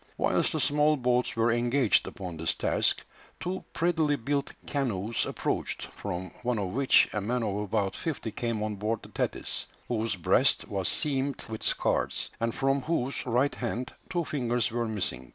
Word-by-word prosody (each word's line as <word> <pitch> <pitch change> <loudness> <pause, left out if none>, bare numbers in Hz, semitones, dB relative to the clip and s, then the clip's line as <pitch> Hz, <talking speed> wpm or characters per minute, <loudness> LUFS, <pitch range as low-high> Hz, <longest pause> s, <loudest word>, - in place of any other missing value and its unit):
Whilst - - +2
the - - 0
small 150 +1 +3
boats 125 -1 +1
were 115 +1 +3
engaged 120 0 +3
upon 90 -4 -6
this 80 +1 0
task, - - +1 0.3
two 185 +1 -3
prettily 160 -3 +2
built 140 +2 -1
canoes 115 -6 -1
approached, - - -2
from 90 +1 -4
one 125 -1 0
of 100 -3 -1
which 130 +7 +5
a 105 - -1
man 120 +4 0
of 105 -3 -1
about 105 -1 0
fifty 145 -8 -3
came 115 -1 -2
on 105 -1 -2
board 110 +2 -1
the - - -11
Thetis, - - -2 0.2
whose 115 -2 0
breast 90 - +3
was 95 -2 -1
seamed 140 -3 0
with 110 -1 -6
scars, - - +1
and 115 0 -1
from 135 +1 +2
whose 140 -3 -1
right 125 +4 +2
hand 125 +2 -3 0.2
two 175 -3 0
fingers 120 -6 0
were 120 0 -1
missing. 90 - -2
120 Hz, 170 wpm, -29 LUFS, 105-140 Hz, 0.3 s, which